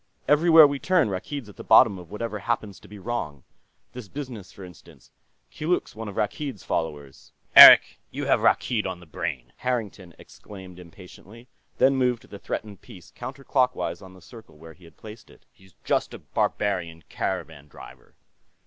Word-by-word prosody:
Everywhere 160 +1 +6
we 140 -1 -1
turn, 180 - +1
Rakkeed's 115 +7 -6
at 105 - -15
the - - -9
bottom 110 -3 +5
of 85 -2 -13
whatever 105 +1 -5
happens 105 -2 -4
to - - -17
be 105 - -12
wrong. 95 - -5 0.5
This 125 -4 -9
business, 120 -7 -9
for 100 - -13
instance; 90 -4 -16 0.4
Keeluk's 165 -3 -3
one 110 0 -7
of 100 - -8
Rakkeed's 120 +1 -4
followers." 75 -4 -5 0.2
"Eric, - - +10
you - - -6
have - - +2
Rakkeed 110 -6 +1
on 95 -1 -6
the 90 - -15
brain!" 80 - -6
Harrington 105 -8 -5
exclaimed 95 -3 -14
impatiently, 95 +7 -15 0.3
then 135 +1 +3
moved 125 -3 -1
the 100 - -10
threatened 105 -1 -7
piece 95 -9 -15
counterclockwise 130 0 -3
on 95 -1 -14
the 95 - -17
circle 115 -9 -15
where 80 +1 -13
he 90 - -20
had 85 - -19
placed 110 +1 -13
it. - - -21
"He's 95 -3 -24
just - - -1
a - - -8
barbarian 85 -5 -3
caravan 80 -6 -5
driver." - - -16
105 Hz, 165 wpm, -24 LUFS, 90-125 Hz, 0.5 s, Eric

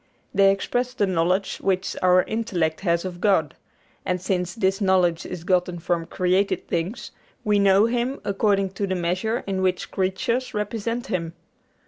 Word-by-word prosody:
They 195 0 +5
express 245 +6 -1
the 205 - +2
knowledge 185 +1 0
which 190 -1 -1
our 180 0 +5
intellect 185 -8 -1
has 170 -2 0
of 180 -1 -6
God; 190 -8 +2 0.5
and 180 0 -1
since 180 -1 -2
this 195 -1 0
knowledge 180 -4 +2
is 180 -2 -6
gotten 180 -1 +1
from 170 0 -2
created 185 +3 0
things, 170 +7 -3 0.3
we 210 -1 +2
know 200 +1 +5
Him 245 +3 -1
according 195 -1 +1
to 200 +1 -3
the 185 - -1
measure 185 +7 -1
in 190 -1 -2
which 185 -1 -1
creatures 235 +6 -1
represent 230 +3 -2
Him. 165 -7 -3
190 Hz, 155 wpm, -24 LUFS, 180-210 Hz, 0.5 s, They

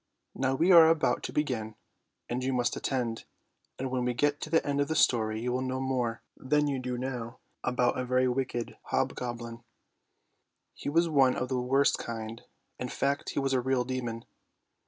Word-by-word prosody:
Now 135 0 0
we 170 +7 +3
are 165 -2 +9
about 160 -2 +2
to - - -4
begin, 115 -8 -2 0.5
and 125 +1 -2
you 130 +1 0
must 125 -1 +1
attend; 120 -4 -2 0.5
and 130 0 -3
when 130 -1 0
we 125 0 -1
get 145 +3 +1
to - - -4
the 160 +1 +2
end 145 0 0
of 145 - +1
the 160 - -1
story, 110 -5 +2
you 125 +2 -2
will 125 +1 0
know 130 0 -2
more 125 -3 -1
than 150 +3 +1
you 140 -2 -1
do 125 -1 -3
now 125 -2 -4 0.3
about 125 0 +1
a - - 0
very 130 +1 +2
wicked 125 -2 -2
hobgoblin. 120 -1 -3 1.1
He - - -5
was 165 +3 +3
one 135 -5 +4
of 125 - -2
the 130 -2 0
worst 135 +3 +2
kind; 115 0 -6 0.4
in 125 - -3
fact 140 +3 -1
he - - 0
was 135 -1 0
a 130 - +2
real 130 0 +1
demon. 120 -2 -4
130 Hz, 190 wpm, -29 LUFS, 120-135 Hz, 1.1 s, are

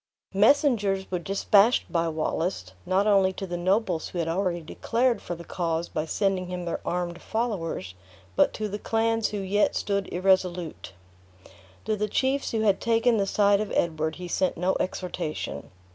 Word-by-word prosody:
Messengers 205 -4 +3
were 180 - 0
dispatched 200 +5 +3
by 170 -2 +1
Wallace, 160 - -2
not 190 +2 +2
only 195 -3 +4
to 195 - -5
the 175 -2 -4
nobles 185 -1 0
who - - -7
had 165 -1 -1
already 175 0 -1
declared 235 +9 0
for 175 - -5
the 170 - -10
cause 170 -1 -2
by 155 - -2
sending 190 +1 0
him 180 -1 -5
their 170 - -2
armed 175 -1 -3
followers, 180 - -3 0.4
but - - +4
to 215 - -2
the 205 +1 -5
clans 225 0 +1
who 210 - -4
yet 200 +1 +1
stood 200 -1 -1
irresolute. 180 - 0 0.9
To 215 - 0
the 210 0 -2
chiefs 270 +5 0
who 225 - -1
had 205 -3 +2
taken 230 0 +3
the 200 -1 +1
side 200 0 +3
of 215 - -4
Edward, 160 -1 0
he 180 0 -7
sent 185 +1 0
no 180 +3 +1
exhortation. 170 - -4
190 Hz, 170 wpm, -26 LUFS, 175-210 Hz, 0.9 s, only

